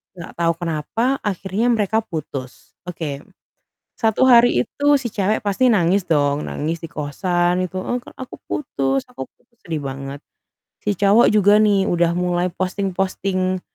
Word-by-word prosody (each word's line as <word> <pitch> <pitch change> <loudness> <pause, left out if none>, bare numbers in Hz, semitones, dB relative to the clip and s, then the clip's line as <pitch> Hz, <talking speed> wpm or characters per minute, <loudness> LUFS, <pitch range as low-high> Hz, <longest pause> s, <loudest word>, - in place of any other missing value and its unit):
enggak 175 -1 -9
tahu 170 0 +2
kenapa 200 - -1
akhirnya 200 +3 -2
mereka 220 +1 +1
putus. 145 - -7 0.2
Oke. 160 -5 -5 0.8
Satu 225 +3 +2
hari 245 -1 +5
itu 285 +5 -5
si 255 -3 -3
cewek 210 +2 0
pasti 210 +6 +2
nangis 190 -3 +2
dong, 145 -2 +1
nangis 160 +3 -3
di 165 - -7
kosan 175 +5 -1
gitu, 185 +1 -5
“Eee, 245 - -2
Kak, - - -16
aku 260 - -8
putus 135 - -1
aku 130 - -8
putus." 235 - -39
Sedih 160 -3 -3
banget. 135 +1 -6 0.6
Si 205 - +1
cowok 205 +5 +5
juga 205 0 +5
nih 205 -2 +3
udah 170 -1 +2
mulai 180 0 0
posting-posting, 185 -1 -2
185 Hz, 150 wpm, -20 LUFS, 165-210 Hz, 0.8 s, hari